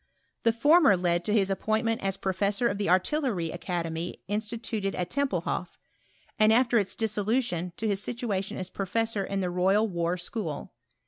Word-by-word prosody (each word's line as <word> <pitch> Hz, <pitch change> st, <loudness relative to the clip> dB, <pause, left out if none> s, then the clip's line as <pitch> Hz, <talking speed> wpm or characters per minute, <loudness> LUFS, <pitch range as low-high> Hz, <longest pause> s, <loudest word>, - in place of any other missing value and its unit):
The 230 Hz, -, +4 dB
fonner 290 Hz, -, +5 dB
led 175 Hz, -1 st, +1 dB
to 210 Hz, -, 0 dB
his 200 Hz, -3 st, +2 dB
appdintment 220 Hz, +4 st, 0 dB
at 195 Hz, 0 st, -2 dB
professsor 200 Hz, +5 st, +1 dB
of 200 Hz, -2 st, -2 dB
the 200 Hz, -, 0 dB
Artillery 185 Hz, -, +1 dB
Academy 170 Hz, -1 st, -3 dB
instituted 210 Hz, -1 st, -3 dB
at 180 Hz, -1 st, -3 dB
Tempelhoff; 280 Hz, -1 st, -1 dB, 0.6 s
and, 215 Hz, 0 st, +6 dB
after 235 Hz, 0 st, +4 dB
its 195 Hz, -2 st, -2 dB
dis 220 Hz, -2 st, -1 dB
^ 205 Hz, -, +1 dB
soiutioa, 195 Hz, -7 st, 0 dB
to 225 Hz, -, -2 dB
his 200 Hz, -2 st, 0 dB
situation 210 Hz, -5 st, -3 dB
as 185 Hz, 0 st, -5 dB
professor 215 Hz, +2 st, -1 dB
in 195 Hz, 0 st, -2 dB
the 180 Hz, -1 st, -1 dB
Royal 190 Hz, +5 st, +3 dB
War 170 Hz, -2 st, -1 dB
School. 175 Hz, -4 st, -5 dB
200 Hz, 170 wpm, -28 LUFS, 180-225 Hz, 0.6 s, and